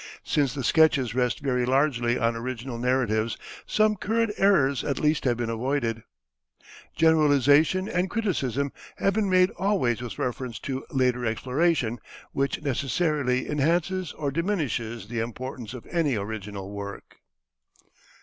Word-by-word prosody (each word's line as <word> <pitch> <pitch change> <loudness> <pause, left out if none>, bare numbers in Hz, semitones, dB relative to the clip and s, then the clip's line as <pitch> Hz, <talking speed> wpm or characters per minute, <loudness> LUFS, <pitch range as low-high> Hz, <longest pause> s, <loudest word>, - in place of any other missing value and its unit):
Since 145 -2 0
the 135 - -3
sketches 140 -6 +3
rest 125 -3 0
very 125 -3 0
largely 125 -2 +2
on 115 0 +1
original 120 +1 -5
narratives 115 -3 +1 0.3
some 215 0 +3
current 225 +3 0
errors 140 -10 +3
at 140 - -1
least 150 -1 +1
have 120 -2 +2
been 120 -1 -2
avoided. 115 -1 -1 0.9
Generalization 155 +3 +4
and 180 0 0
criticism 140 - -1 0.3
have 195 - +1
been 210 -1 +1
made 185 0 +4
always 180 - +1
with 120 -2 -6
reference 125 -1 -3
to 135 -1 -4
later 125 -2 +1
exploration, 125 +1 0 0.3
which 140 +2 -1
necessarily 140 -1 0
enhances 170 +4 0
or 145 -3 -3
diminishes 135 - -2
the 115 +1 -3
importance 120 +1 -5
of 125 - -9
any 160 -7 +1
original 100 -2 -5
work. 100 0 -8
135 Hz, 130 wpm, -26 LUFS, 120-160 Hz, 0.9 s, Generalization